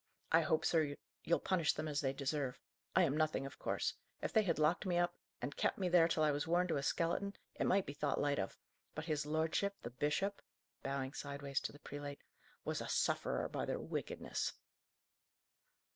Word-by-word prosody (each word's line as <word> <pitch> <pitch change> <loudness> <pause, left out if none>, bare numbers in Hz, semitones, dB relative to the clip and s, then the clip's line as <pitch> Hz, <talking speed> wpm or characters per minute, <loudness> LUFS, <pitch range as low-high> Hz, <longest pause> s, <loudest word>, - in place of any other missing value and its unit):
I 165 - +7
hope, 160 0 +2
sir, 155 -4 +3 0.3
you'll 170 - +3
punish 170 -5 +2
them 155 +1 -3
as 145 -1 0
they 135 -2 +1
deserve. 140 -1 -1 0.4
I 185 - +7
am 145 -4 +2
nothing, 155 -3 +1
of 135 - -8
course. - - 0 0.3
If - - -3
they 220 - +6
had 175 -6 +1
locked 155 +3 +3
me 180 -2 +1
up, 175 0 +2 0.3
and 140 +3 -2
kept - - +1
me 185 -2 +1
there 170 -2 +7
till 160 -2 +2
I 150 - +5
was 145 +2 -1
worn 175 +2 +3
to 160 - +2
a - - 0
skeleton, 175 +7 0 0.2
it - - 0
might 195 0 +4
be 145 - -5
thought 145 -1 0
light 145 -4 +2
of; 95 - -3 0.4
but 155 - -3
his 150 -2 -1
lordship, 160 +6 +1
the 120 - -5
bishop" 150 +10 0 0.4
bowing 135 0 -2
sideways 140 -1 -2
to - - -3
the - - -12
prelate 145 -1 -7 0.4
"was - - -1
a - - -4
sufferer - - +1
by - - -3
their - - -1
wickedness." - - -2
155 Hz, 200 wpm, -37 LUFS, 145-170 Hz, 0.4 s, I